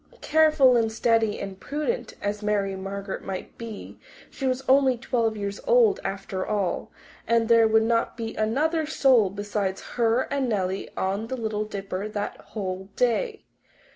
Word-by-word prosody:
Careful 310 -5 +5
and 225 -2 +2
steady 225 -1 +1
and 195 -1 -6
prudent 305 +12 -3
as 205 +1 -2
Mary 205 -2 0
Margaret 195 +1 -5
might 190 -1 -6
be, 230 -3 -8 0.3
she 270 - -3
was 255 +1 -1
only 265 -1 +4
twelve 230 -3 0
years 200 0 -4
old, 480 -5 +5
after 195 -1 -3
all, 205 -4 -2 0.4
and 230 -1 +3
there 230 -1 +6
would 220 0 +4
not 230 +2 0
be 225 -1 -4
another 300 +9 0
soul 260 -9 +4
besides 200 -1 -2 0.2
her 235 +1 +3
and 270 -3 0
Nellie 190 -3 -1
on 200 +4 -1
the 260 - -4
Little 215 -2 -2
Dipper 195 -1 -4
that 205 -1 -3
whole 190 -2 -6
day. 425 - 0
220 Hz, 155 wpm, -25 LUFS, 200-255 Hz, 0.4 s, there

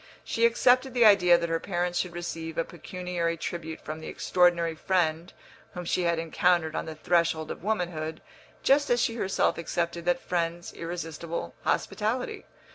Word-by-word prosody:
She 230 0 +3
accepted 250 +2 +3
the 240 -2 +5
idea 180 -4 +7
that 170 0 -2
her 165 0 0
parents 175 -1 -1
should 175 -2 -3
receive 165 -2 -5
a 165 - +2
pecuniary 175 0 -3
tribute 160 -1 -5
from 155 +1 -6
the 160 - -8
extraordinary 175 -2 +2
friend 170 0 0 0.4
whom 180 0 -5
she 175 +1 0
had 170 -1 +2
encountered 165 0 +1
on - - -3
the 160 - -6
threshold 165 -1 +1
of - - -7
womanhood, 170 -6 -2 0.4
just 285 +1 +4
as 240 - +3
she 230 - +1
herself 195 -7 0
accepted 170 0 -2
that 175 0 +2
friend's 170 -1 -2
irresistible 170 -1 -5
hospitality. 225 +4 -1
175 Hz, 160 wpm, -28 LUFS, 165-180 Hz, 0.4 s, idea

